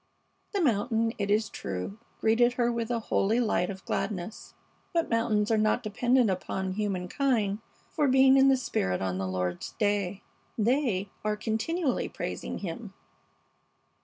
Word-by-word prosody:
The 400 - +1
mountain, 230 -3 +1
it 200 0 -1
is 215 +1 +2
true, 95 - -5 0.2
greeted 240 +2 +3
her 240 -1 +1
with 235 -1 -2
a 240 - +1
holy 220 +1 +1
light 215 -6 +1
of 195 -1 -7
gladness, 200 +1 -4 0.4
but 335 -5 0
mountains 225 -2 +2
are 220 - +3
not 215 +3 +2
dependent 240 +3 +2
upon 190 +1 -3
humankind 205 +2 0 0.3
for 300 -3 +1
being 265 0 +6
in 270 0 +6
the 265 - +5
spirit 95 - -1
on 95 -1 -2
the 95 - -2
Lord's 90 -1 -3
day. 205 -3 0 0.3
They 220 -4 +1
are 210 0 0
"continually 255 +8 -1
praising - - -5
Him." 195 +2 -6
215 Hz, 145 wpm, -28 LUFS, 195-245 Hz, 0.4 s, being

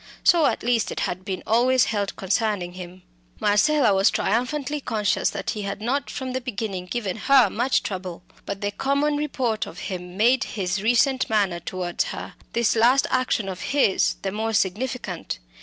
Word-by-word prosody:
So, 335 -4 +5
at 230 - -1
least, 235 -2 +1
it - - -3
had 185 +1 -2
been 190 -1 -4
always 245 +2 +4
held 205 -3 -2
concerning 195 -2 -1
him. 180 0 -10 0.4
Marcella 215 +3 +3
was 195 +2 +4
triumphantly 270 +6 -1
conscious 210 -6 0
that - - -3
he 210 - -4
had 200 0 -4
not 265 +6 -1
from 260 -2 -5
the 260 - -2
beginning 205 -7 -4
given 205 -2 -3
her 255 -4 +4
much 245 +4 +1
trouble. 185 -3 -5 0.2
But 200 0 -4
the 205 0 -1
common 280 +6 0
report 250 -7 -1
of 175 - -10
him 180 -1 -6
made 250 +5 +4
his 195 0 -1
recent 245 +4 +2
manner 200 -5 +1
towards 175 0 -2
her, - - -6 0.2
this 235 +1 +2
last 245 +4 +4
action 255 -5 +1
of 185 -1 -5
his, 270 -8 +2
the 195 - -1
more 220 +2 -2
significant. 205 -1 -2
220 Hz, 175 wpm, -24 LUFS, 190-255 Hz, 0.4 s, So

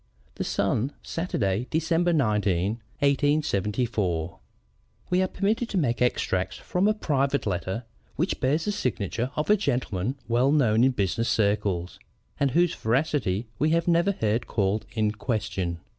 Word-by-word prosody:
_ - - -34
(The - - -2
Sun, 130 +6 0
Saturday, 120 - -1
December 165 +2 +1
19, 105 - +1 0.2
1874.) 110 - 0 0.7
We 180 +1 +3
are 185 - +2
permitted 215 +6 -1
to 200 - -2
make 125 -9 0
extracts 95 -6 0
from 180 +3 0
a 215 - +2
private 140 -7 0
letter 95 +3 -2 0.3
which 170 +6 -1
bears 145 +5 +1
the 210 - 0
signature 120 - -2
of 150 +7 0
a - - +7
gentleman 120 - -1
well 120 +4 +3
known 120 -6 +3
in 130 0 +4
business 115 +2 0
circles, 100 -4 0 0.4
and 140 - +3
whose 170 +5 +2
veracity 120 -4 0
we 155 +3 +3
have 165 +1 +1
never 170 +3 +3
heard 115 - -1
called 100 0 0
in 110 -1 +2
question. 105 -6 -2
120 Hz, 145 wpm, -26 LUFS, 105-155 Hz, 0.7 s, a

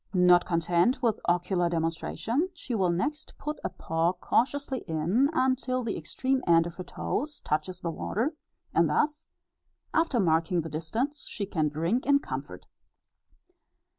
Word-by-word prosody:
Not 180 -1 +6
content 175 - +2
with 225 -3 +2
ocular 175 0 +1
demonstration, 170 - -1
she 275 -7 -6
will 190 -5 +2
next 295 - -2
put 300 +1 -4
a - - -1
paw 165 +2 0
cautiously 265 +8 0
in, 175 - +2
until 255 -3 +1
the 225 -3 -2
extreme 260 - -1
end 165 -1 +5
of 170 0 -7
her 185 - -5
toes 295 +10 -3
touches 165 +4 -2
the 170 - -2
water, 235 - -1 0.4
and - - +4
thus, 300 +1 0 0.7
after 325 -7 +2
marking 165 -1 +2
the 165 - -6
distance, 225 - -3
she 205 - -3
can 155 -6 0
drink 165 - -1
in 285 0 +6
comfort. 280 - -6
190 Hz, 145 wpm, -28 LUFS, 170-265 Hz, 0.7 s, Not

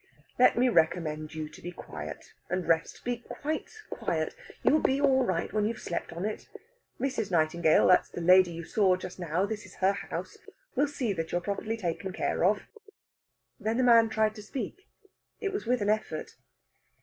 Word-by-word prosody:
"Let 250 - +6
me 250 +2 +4
recommend 160 -5 +1
you 155 -1 -3
to - - -14
be 175 - -6
quiet - - -8 0.2
and 180 0 -2
rest. 165 0 0
Be 245 0 0
quite 295 +6 -4 0.2
quiet. - - -2 0.3
You - - +5
will 310 - +4
be 265 +1 +2
all 270 -2 +4
right 185 -5 -1
when 215 -1 +1
you 225 - 0
have - - -12
slept 170 - -3
on 170 +3 -4
it. 215 - -5 0.5
Mrs. 250 -6 -1
Nightingale 160 -1 +3
that's 180 - +5
the - - -7
lady 180 +1 +6
you 170 0 -6
saw 190 +1 +3
just 185 0 -8
now; 175 +2 0
this 210 0 -4
is 185 - -14
her 195 +1 +3
house 200 - -6 0.4
will 285 +3 +3
see 255 -7 -2
that 165 -3 -4
you - - +1
are - - -2
properly 210 +4 -3
taken 190 -1 -3
care - - -1
of." 200 +3 +3 1.0
Then 220 +1 -1
the 255 - +3
man 230 -2 +6
tried 220 -1 +1
to 215 - -9
speak; 255 - -6 0.5
it 400 -3 -2
was 400 - -4
with 250 -1 +2
an 205 - 0
effort. 215 -7 -3
200 Hz, 195 wpm, -29 LUFS, 175-235 Hz, 1.0 s, Let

